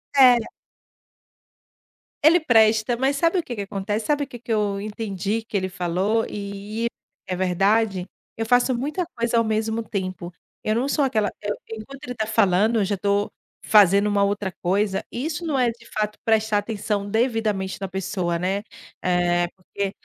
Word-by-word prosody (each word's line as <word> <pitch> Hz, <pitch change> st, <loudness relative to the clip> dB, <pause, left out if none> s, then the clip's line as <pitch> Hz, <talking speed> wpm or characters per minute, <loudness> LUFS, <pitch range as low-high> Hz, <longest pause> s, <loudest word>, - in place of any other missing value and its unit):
Era. 250 Hz, -4 st, +6 dB, 1.8 s
Ele 325 Hz, +4 st, +7 dB
presta, 225 Hz, -4 st, +4 dB
mas 265 Hz, +3 st, +1 dB
sabe 335 Hz, +5 st, +2 dB
o -, -, -2 dB
que 245 Hz, -, -6 dB
que 205 Hz, -, -4 dB
acontece? 205 Hz, +2 st, -3 dB
Sabe 295 Hz, -1 st, +2 dB
o -, -, -6 dB
que 245 Hz, -3 st, -10 dB
que 235 Hz, -, -7 dB
eu 205 Hz, -2 st, 0 dB
entendi 210 Hz, 0 st, -3 dB
que 220 Hz, -, -9 dB
ele 185 Hz, -1 st, 0 dB
falou 185 Hz, +5 st, 0 dB
e 205 Hz, +3 st, -4 dB, 0.4 s
é 185 Hz, -, -2 dB
verdade, 195 Hz, +2 st, +1 dB, 0.3 s
eu 225 Hz, -, -2 dB
faço 245 Hz, +3 st, +3 dB
muita 300 Hz, +9 st, -2 dB
coisa 235 Hz, 0 st, 0 dB
ao 230 Hz, -, +4 dB
mesmo 220 Hz, +1 st, -1 dB
tempo. 185 Hz, -4 st, -4 dB, 0.3 s
Eu 215 Hz, -, +1 dB
não 255 Hz, +4 st, 0 dB
sou 285 Hz, -1 st, +2 dB
aquela 215 Hz, -6 st, +1 dB
eu 205 Hz, 0 st, -2 dB
Enquanto 260 Hz, +6 st, -9 dB
ele 250 Hz, -3 st, -5 dB
tá 220 Hz, -2 st, -1 dB
falando, 215 Hz, +1 st, +3 dB
eu 200 Hz, -, +2 dB
já 200 Hz, +1 st, -1 dB
tô 200 Hz, +1 st, 0 dB, 0.3 s
fazendo 200 Hz, -1 st, +5 dB
uma 205 Hz, -1 st, +2 dB
outra 200 Hz, -1 st, -1 dB
coisa, 195 Hz, +2 st, +1 dB
isso 305 Hz, +7 st, -3 dB
não 295 Hz, -5 st, 0 dB
é 245 Hz, -2 st, +3 dB
de 235 Hz, 0 st, -16 dB
fato 210 Hz, 0 st, -2 dB
prestar 220 Hz, -1 st, +2 dB
atenção 205 Hz, -1 st, -3 dB
devidamente 220 Hz, -4 st, 0 dB
na 195 Hz, -, -2 dB
pessoa, 185 Hz, -2 st, -2 dB
né, 190 Hz, +3 st, -1 dB, 0.4 s
eh, 175 Hz, -1 st, +2 dB
porque 195 Hz, +1 st, -4 dB
215 Hz, 170 wpm, -23 LUFS, 195-235 Hz, 1.8 s, Ele